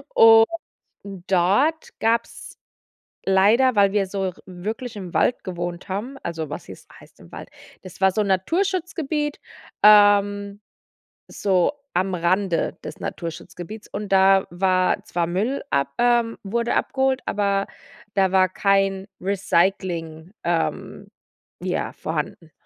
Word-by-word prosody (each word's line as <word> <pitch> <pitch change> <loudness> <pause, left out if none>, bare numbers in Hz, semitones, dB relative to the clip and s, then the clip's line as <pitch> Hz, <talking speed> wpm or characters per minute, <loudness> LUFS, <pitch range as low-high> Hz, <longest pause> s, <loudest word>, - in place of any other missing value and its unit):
Und 225 0 +8 0.6
dort 195 - 0
gab's 230 +1 -2 0.7
leider, 215 +6 +4
weil 200 -1 +4
wir 200 -2 +1
so 195 +1 -3
r 185 - -4
wirklich 215 +7 -6
im 185 -4 -7
Wald 245 - +1
gewohnt 175 -1 -5
haben, 225 +8 -4
also, 160 -2 -4
was - - -6
hieß - - -12
heißt - - -19
im - - -16
Wald. - - -9 0.3
Das 185 - -12
war 190 0 +5
so 215 - +1
'n - - -2
Naturschutzgebiet, 315 - -1 0.4
ähm, 205 -1 +5 0.7
so 190 +4 +1 0.2
am 185 +1 0
Rande 180 +1 0
des - - -8
Naturschutzgebietes, 175 +5 -7
und 205 0 -5
da 195 0 +5
war 185 +1 +1
zwar 170 -1 -1
Müll 210 +11 -1
ab 140 0 +1
ähm, 240 -1 +2
wurde 235 +4 -1
abgeholt, 265 -1 0
aber 200 -1 0 0.5
da 190 -2 +2
war 185 -1 +4
kein 195 0 +1
Recycling, 180 -3 -1
ähm, 170 -1 -2 0.6
ja, - - -2
vorhanden. 165 -2 -5
195 Hz, 125 wpm, -22 LUFS, 185-225 Hz, 0.7 s, Und